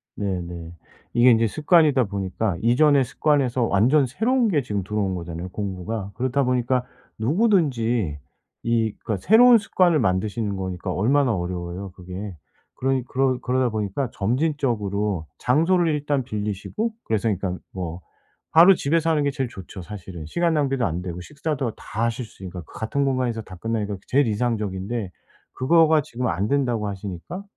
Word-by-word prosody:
네네. 85 -4 -4 0.4
이게 120 +1 +6
인제 115 -1 +4
습관이다 150 - +3
보니까 95 -1 -2
이전의 135 +4 +4
습관에서 130 -2 +1
완전 120 +7 +3
새로운 230 - +1
게 150 -6 +2
지금 105 -6 -3
들어온 100 -1 -1
거잖아요 85 +1 -6
공부가. 100 +1 -4
그렇다 130 +2 0
보니까 125 0 +1 0.3
누구든지 120 - +1 0.4
이 115 -2 +1
그러니까 110 -4 -1
새로운 235 +3 +8
습관을 180 -6 +2
만드시는 100 +1 0
거니까 95 0 -4
얼마나 125 +5 +2
어려워요 90 +1 -4
그게. 90 +1 -8 0.4
그러니 135 0 0
그러 130 -1 +1
그러다 130 0 +1
보니까 110 +4 -2
점진적으로 105 - -1
장소를 165 +6 +2
일단 145 -2 0
빌리시고 105 - -3
그래서 110 0 0
일단 95 -2 -2
뭐 90 -2 -5 0.5
바로 175 +4 +8
집에서 165 +2 +1
하는 150 -2 +2
게 140 - +1
제일 135 -3 -3
좋죠 95 0 -9
사실은 90 -3 -8
시간 170 - 0
낭비도 135 -5 +1
안 85 +2 -2
되고 90 -1 -5
식사도 140 - -3
다 110 - -4
하실 115 +1 -2
수 100 - -16
있으니까. 90 -1 -6
그 - - -18
같은 140 +6 -1
공간에서 130 -4 0
다 95 -3 -11
끝내니까 105 0 -2
제일 140 0 +3
이상적인데 105 -2 -2 0.4
그거가 160 +3 +4
지금 125 -2 -4
안 95 +6 -1
된다고 120 -6 0
하시니까 100 - -6
115 Hz, 375 characters per minute, -23 LUFS, 95-140 Hz, 0.5 s, 새로운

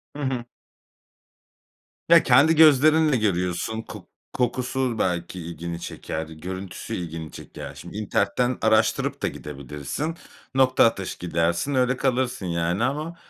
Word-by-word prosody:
Hı 145 - -6
hı. 130 -3 -2 1.6
Ya, 170 0 +8
kendi 140 +6 +5
gözlerinle 155 -1 +6
görüyorsun. 90 +1 -1
Kok - - -11 0.3
kokusu 125 -1 -1
belki 90 0 -1
ilgini 85 0 -6
çeker. 80 -1 -5
Görüntüsü 90 +4 -6
ilgini 80 -2 -6
çeker. - - -9
Şimdi - - -9
internetten 110 +4 0
araştırıp 110 0 +2
da - - +1
gidebilirsin. 75 - -5 0.4
Nokta 130 -1 +5
atışı 100 -4 -1
gidersin. 85 - 0
Öyle 125 0 +2
kalırsın, 130 -6 0
yani, 85 +4 0
ama 150 +6 -2
110 Hz, 115 wpm, -24 LUFS, 85-130 Hz, 1.6 s, Ya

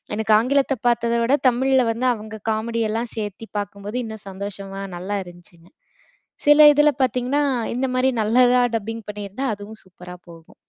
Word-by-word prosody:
எனக்கு 220 0 +1
ஆங்கிலத்த 270 +3 +1
பார்த்தத 235 0 +1
விட 255 +5 +3
தமிழ்ல 260 +2 +2
வந்து 240 +3 -1
அவுங்க 220 -1 -9
காமெடியெல்லாம் 225 +1 -2
சேர்த்தி 210 +1 -5
பார்க்கும்போது, 205 +3 -6
இன்னும் 220 -2 -9
சந்தோஷமா, 195 0 -7 0.2
நல்லா 195 +4 -3
இருந்துச்சுங்க. 175 -1 -16 0.8
சில 295 +1 +7
இதுல 295 +1 +4
பார்த்தீங்கன்னா, 255 +3 0 0.3
இந்த 265 +1 -1
மாரி 255 +1 +2
நல்லதா 245 +3 +4
டப்பிங் 225 0 -6
பண்ணியிருந்தா 205 +5 -5
அதுவும் 210 +2 -11
சூப்பரா 180 -1 -12
போகும். 165 -1 -16
220 Hz, 140 wpm, -22 LUFS, 200-250 Hz, 0.8 s, சில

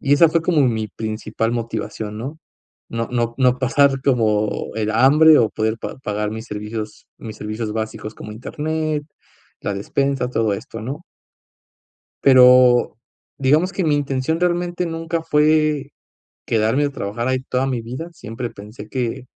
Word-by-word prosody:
y 140 - +1
esa 165 +3 +6
fue 165 +1 +1
como 165 -3 +2
mi 110 -4 0
principal 110 +2 -3
motivación, 110 -2 -4
¿no?, 140 +7 -6 0.5
no 115 0 -3
no 120 -1 -1
no 125 -1 +3
pasar 135 +1 +3
como 110 -6 +2 0.2
el 110 -1 -1
hambre 145 +7 +6
o 110 - +3
poder 110 +1 -1
pa - - -6
pagar 105 0 -2
mis 110 +1 -6
servicios 105 0 -6
mis 110 -1 -8
servicios 110 +1 -4
básicos 110 0 -5
como 105 - -9
Internet, 155 +5 -3 0.6
la 100 - -2
despensa, 135 +5 -1
todo 110 -4 +1
esto, 115 +2 -6
¿no? 140 +8 -5 1.2
Pero, 125 -3 +6 0.4
digamos 150 +7 +2
que 190 - -1
mi 155 -2 +2
intención 145 +3 -1
realmente 175 0 0
nunca 165 0 -3
fue 150 -2 +2 0.6
quedarme 115 +6 +2
a 145 - -2
trabajar 115 -1 -4
ahí 130 0 +1
toda 130 0 -1
mi 125 -3 -2
vida, 130 +9 -6
siempre 115 -4 -6
pensé 105 +1 -11
que, 125 +1 -3
125 Hz, 150 wpm, -20 LUFS, 110-145 Hz, 1.2 s, esa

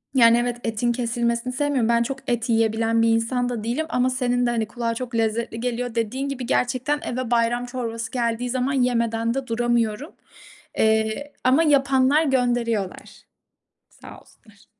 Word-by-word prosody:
Yani 230 -1 +6
evet 240 0 -1
etin 230 +1 0
kesilmesini 235 0 -1
sevmiyorum. 265 -4 0
Ben 235 0 +3
çok 270 +2 -4
et 240 +1 -1
yiyebilen 225 0 +2
bir 230 - +3
insan 245 +2 +1
da 230 -3 -4
değilim 250 +8 -1
ama 250 +1 +1
senin 245 -1 0
de - - +1
hani 230 -2 0
kulağa 230 0 -3
çok 245 -1 -5
lezzetli 225 +1 -1
geliyor 245 0 -3
dediğin 255 +5 -2
gibi. 260 -3 -4
Gerçekten 255 +4 0
eve 245 -1 -3
bayram 240 +1 +1
çorbası 230 -2 -5
geldiği 240 -1 -1
zaman 260 +2 -1
yemeden 230 -3 +1
de 270 -1 -4
duramıyorum. 235 +3 0 0.7
Eee, 220 +6 +1
ama 265 +6 +4
yapanlar 275 0 +3
gönderiyorlar. 240 -7 -1 0.8
Sağ - - -13
olsunlar. 205 -4 -23
240 Hz, 155 wpm, -23 LUFS, 230-255 Hz, 0.8 s, Yani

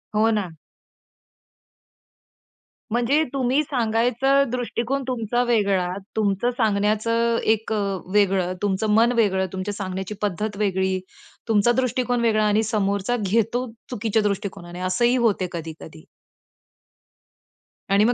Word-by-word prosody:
हो 220 +1 +4
ना. 195 -6 -2 2.4
म्हणजे 245 +6 +2
तुम्ही 265 +2 +2
सांगायचा 250 +2 +2
दृष्टिकोन 250 +2 -2
तुमचा 240 -1 0
वेगळा, 200 -6 +1 0.3
तुमचं 215 +3 +1
सांगण्याचं 220 +2 +1 0.2
एक 220 0 -4
अ, - - 0 0.4
वेगळं, 190 -3 +2
तुमचं 205 +1 0
मन 230 +2 +4
वेगळं, 190 -4 +2
तुमच्या 190 +2 -3
सांगण्याची 190 0 -4
पद्धत 205 +1 -2
वेगळी, 190 -2 0 0.5
तुमचा 225 +1 +3
दृष्टिकोन 245 -1 0
वेगळा 215 -2 +2
आणि 210 +2 +2
समोरचा 200 +1 0
घेतो 230 +5 0 0.2
चुकीच्या 220 -2 0
दृष्टिकोनाने. 185 -3 -4
असंही 210 +7 +2
होते 215 -7 +1
कधी-कधी. 160 -1 -8 1.9
आणि 200 +1 +5
मग 245 - +3
215 Hz, 110 wpm, -23 LUFS, 195-240 Hz, 2.4 s, आणि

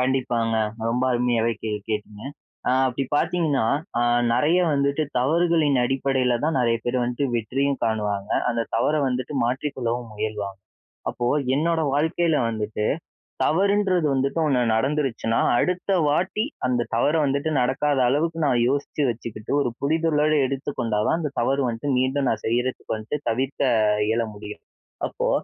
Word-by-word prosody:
கண்டிப்பாங்க, 125 -3 0 0.3
ரொம்ப 125 +2 0
அருமையாவே 120 -1 +1
கே 110 - -2 0.2
கேட்டீங்க, 105 0 -4 0.5
ஆ - - +3 0.2
அப்பிடி 130 +2 -2
பார்த்தீங்கன்னா, 150 -11 +1 0.3
ஆ - - +2 0.3
நிறைய 155 +8 +3
வந்துட்டு 140 +2 +1 0.2
தவறுகளின் 155 0 +2
அடிப்படையில 130 -1 +1
தான் 160 -2 +1
நிறைய 115 -1 +2
பேரு 125 +1 0
வந்துட்டு 125 +3 -1
வெற்றியும் 135 +5 -1
காணுவாங்க, 105 -2 -1 0.2
அந்த 115 -1 0
தவற 135 +6 +2
வந்துட்டு 130 +3 -3
மாற்றிக் 135 +4 -2
கொள்ளவும் 120 -2 -3
முயல்வாங்க, 105 -2 -4 0.5
அப்போ, 120 - -2 0.3
என்னோட 165 +2 +1
வாழ்க்கையில 160 +2 +1
வந்துட்டு, 105 -1 -3 0.6
தவறுன்றது 190 -1 +2
வந்துட்டு 135 +4 0
1 130 -4 +2
நடந்துருச்சுனா, 130 -3 0 0.2
அடுத்த 180 +1 -1 0.2
வாட்டி 185 - 0 0.2
அந்த 125 -1 +1
தவற 145 +6 +2
வந்துட்டு 140 +3 0
நடக்காத 140 +3 +1
அளவுக்கு 165 +4 0
நான் 120 -3 +2
யோசிச்சு 145 +1 -1
வச்சுக்கிட்டு 110 -1 -5
ஒரு 125 - -1
புரிதலோட 155 0 +2
எடுத்துக் 135 +1 -4
கொண்டா 110 -3 0
தான் - - +2
அந்த 150 -4 -3
தவற 135 +3 +1
வந்ட்டு 120 +5 -2
மீண்டும் 130 +1 +1
நான் 110 - -2
செய்யிறதுக்கு 120 0 -1
வந்ட்டு, 110 +7 -4
தவிர்க்க 130 +5 -2 0.5
இயல 115 +1 +1
முடியும். 105 0 -9 0.4
அப்போ, - - -2
130 Hz, 140 wpm, -24 LUFS, 115-150 Hz, 0.6 s, ஆ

